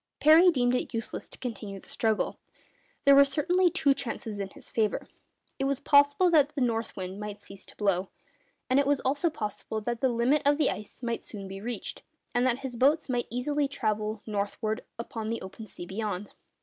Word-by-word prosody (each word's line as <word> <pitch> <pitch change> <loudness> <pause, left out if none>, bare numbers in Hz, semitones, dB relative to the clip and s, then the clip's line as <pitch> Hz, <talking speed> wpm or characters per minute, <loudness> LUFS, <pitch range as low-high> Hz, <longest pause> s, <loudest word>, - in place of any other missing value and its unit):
Parry 320 +4 +7
deemed 250 -6 +2
it 250 -1 -1
useless 230 - -4
to - - -10
continue 210 -5 -6
the - - -19
struggle. 220 -2 0 0.7
There 280 - +8
were 280 0 +9
certainly 330 +6 +2
two 295 -4 +3
chances 225 -5 -5
in 195 -1 -3
his - - -12
favour. 215 -2 0 0.5
It 270 - 0
was 275 -1 0
possible 285 +5 +5
that 300 -2 +4
the 280 - -1
north 230 -3 -1
wind 190 +1 -5
might 210 -1 -6
cease 195 0 -11
to - - -12
blow, 195 -2 0 0.6
and 260 +2 +4
it 280 - +2
was 285 -1 +3
also 285 +6 +1
possible 220 -5 -4
that 235 +1 -3
the 260 - +3
limit 245 +5 +2
of 285 +1 +4
the 305 - +3
ice 210 +4 -8
might 235 -1 -2
soon 200 -3 -8
be 195 0 -7
reached, 240 +2 -4 0.3
and 245 +1 +3
that 245 -1 +2
his 250 -2 -5
boats 285 +5 +3
might 245 -1 -1 0.4
travel 215 -4 -1
easily - - -29
northward 215 +3 -2
upon 225 -1 -5
the 230 - -2
open 195 +4 -9
sea 175 - -9
beyond. 200 0 -4
235 Hz, 200 wpm, -28 LUFS, 210-280 Hz, 0.7 s, were